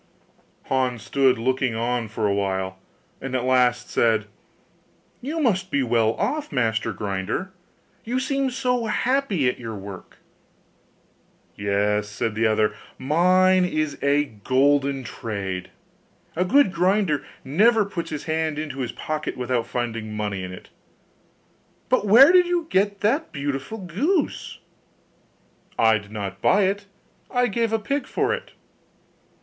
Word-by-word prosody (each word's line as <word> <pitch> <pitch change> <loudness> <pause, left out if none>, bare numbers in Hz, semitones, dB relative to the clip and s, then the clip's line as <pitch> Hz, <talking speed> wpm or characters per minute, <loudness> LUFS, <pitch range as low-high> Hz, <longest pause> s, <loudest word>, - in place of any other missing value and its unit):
Hans 130 -3 -1
stood 135 -2 +2
looking 130 0 0
on 120 0 -1
for 110 0 -3
a 100 - +2
while, 95 -1 -2 0.4
and 135 -1 -4
at 125 - 0
last 125 -1 +2
said, 110 -2 +2 1.0
'You 300 +6 -3
must 195 - +1
be 140 -5 +1
well 115 -2 +2
off, 305 -1 -2
master 115 -4 0
grinder! 100 - -3 0.5
you 245 +3 -1
seem 275 0 0
so 250 -2 -1
happy 220 - +1
at 125 - -1
your 115 -3 -6
work.' 100 -1 -10 1.4
'Yes,' 105 +1 0
said 110 +1 -2
the 110 +1 +2
other, 110 -1 +2 0.2
'mine 185 +6 +4
is 155 -4 -1
a 145 +1 +3
golden 135 +4 +1
trade; 100 -6 -5 0.7
a 180 +3 +1
good 255 -2 +4
grinder 180 -3 +1 0.2
never 210 - +4
puts 190 -4 -5
his 150 - -5
hand 160 -1 -1
into 150 -3 -5
his 125 -2 -2
pocket 155 0 -4
without 125 -2 -1
finding 115 -3 -4
money 105 -2 -3
in 90 - -6
it 90 - -11 1.2
but 250 -5 +2
where 255 +10 +8
did 360 -1 +5
you 350 -2 0
get 200 +1 +1
that 275 +10 +1
beautiful 140 +7 -4
goose?' 230 - -1 1.2
'I 110 -1 +4
did 100 -1 -15
not 100 -2 -5
buy 200 +1 +4
it, 200 +1 -1 0.4
I 245 0 +2
gave 230 0 0
a 225 - +2
pig 265 +5 -2
for - - 0
it. - - -6
140 Hz, 140 wpm, -23 LUFS, -, 1.4 s, where